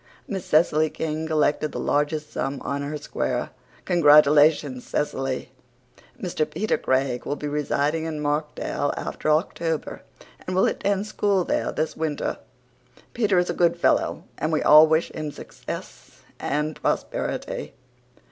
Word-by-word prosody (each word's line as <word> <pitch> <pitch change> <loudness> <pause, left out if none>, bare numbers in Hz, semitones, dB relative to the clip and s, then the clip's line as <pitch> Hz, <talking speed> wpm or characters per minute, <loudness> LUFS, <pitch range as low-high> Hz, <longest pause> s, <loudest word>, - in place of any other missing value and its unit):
Miss 195 -3 -4
Cecily 155 0 +3
King 160 0 -3
collected 155 -1 +1
the - - -4
largest 150 +1 0
sum 135 0 -2
on 140 0 -2
her 145 +2 -4
square. 125 -4 -3 0.3
Congratulations, 150 -4 +5
Cecily. 135 -3 -2 0.7
Mr. 170 -4 -2
Peter 215 +7 0
Craig 130 -1 0
will 145 - -2
be 150 - -5
residing 150 +2 0
in 160 -2 -4
Markdale 150 -1 -1
after - - -3
October 160 0 -1 0.5
and 185 - -2
will 190 - +4
attend 200 0 0
school 205 -3 +1
there - - -1
this 155 0 -2
winter. 155 -2 -2 0.7
Peter 210 -5 +2
is 180 0 +2
a - - -3
good 170 -1 +2
fellow - - +1 0.2
and 155 - -1
we 155 - +1
all 155 +1 +8
wish 160 +1 +1
him 155 -1 -4
success - - -9 0.2
and 150 +2 -2
prosperity. 75 - -2
155 Hz, 140 wpm, -24 LUFS, 145-165 Hz, 0.7 s, all